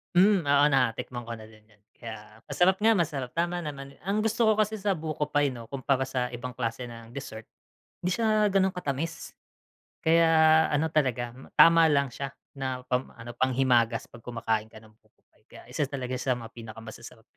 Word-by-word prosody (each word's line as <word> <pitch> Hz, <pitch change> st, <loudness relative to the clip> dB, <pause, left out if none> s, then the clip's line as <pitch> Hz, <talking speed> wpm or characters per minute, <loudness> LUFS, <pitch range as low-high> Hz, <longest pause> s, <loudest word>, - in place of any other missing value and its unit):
Hm, 185 Hz, -3 st, +4 dB
oo 145 Hz, 0 st, +5 dB
natikman 120 Hz, -2 st, -1 dB
ko 115 Hz, -, -4 dB
na 110 Hz, -, -11 dB
din 110 Hz, 0 st, -15 dB
'yon, 105 Hz, -2 st, -27 dB, 0.2 s
kaya 110 Hz, -2 st, -10 dB
masarap 190 Hz, +1 st, +2 dB
nga 225 Hz, +1 st, +4 dB
masarap 145 Hz, -8 st, -1 dB
tama 175 Hz, +1 st, 0 dB
naman. 140 Hz, -4 st, -8 dB
Ang 200 Hz, +4 st, -1 dB
gusto 225 Hz, +1 st, +2 dB
ko 220 Hz, -, +4 dB
kasi 215 Hz, 0 st, 0 dB
sa 200 Hz, -1 st, 0 dB
buko 155 Hz, -2 st, -3 dB
pie 145 Hz, -1 st, +1 dB
'no 120 Hz, -2 st, -9 dB
kumpara 135 Hz, 0 st, -1 dB
sa 125 Hz, -2 st, -2 dB
ibang 120 Hz, 0 st, -6 dB
klase 115 Hz, 0 st, -3 dB
ng 115 Hz, -1 st, -11 dB
dessert 115 Hz, -4 st, -7 dB, 0.6 s
hindi 180 Hz, +1 st, 0 dB
siya 215 Hz, -2 st, +3 dB
gano'n 190 Hz, -1 st, +2 dB
katamis. 160 Hz, -2 st, -4 dB, 0.7 s
Kaya 160 Hz, -1 st, +5 dB
ano 150 Hz, +2 st, 0 dB
talaga 125 Hz, -6 st, 0 dB, 0.2 s
tama 165 Hz, 0 st, +7 dB
lang 140 Hz, -3 st, +2 dB
siya 140 Hz, +2 st, -6 dB, 0.2 s
na 130 Hz, -1 st, -3 dB
pang 125 Hz, +1 st, +1 dB
ano 115 Hz, +1 st, -10 dB
panghimagas 125 Hz, -3 st, +2 dB
'pag 120 Hz, -, -12 dB
kumakain 115 Hz, -2 st, -2 dB
ka 110 Hz, 0 st, -15 dB
ng 110 Hz, -, -18 dB
buko -, -, -36 dB
pie, -, -, -33 dB
kaya -, -, -14 dB
isa 145 Hz, -, -1 dB
talaga 130 Hz, -2 st, -4 dB
sa 125 Hz, 0 st, 0 dB
mga 115 Hz, -2 st, -9 dB
pinakamasasarap. 115 Hz, 0 st, -11 dB
135 Hz, 185 wpm, -27 LUFS, 120-165 Hz, 0.7 s, tama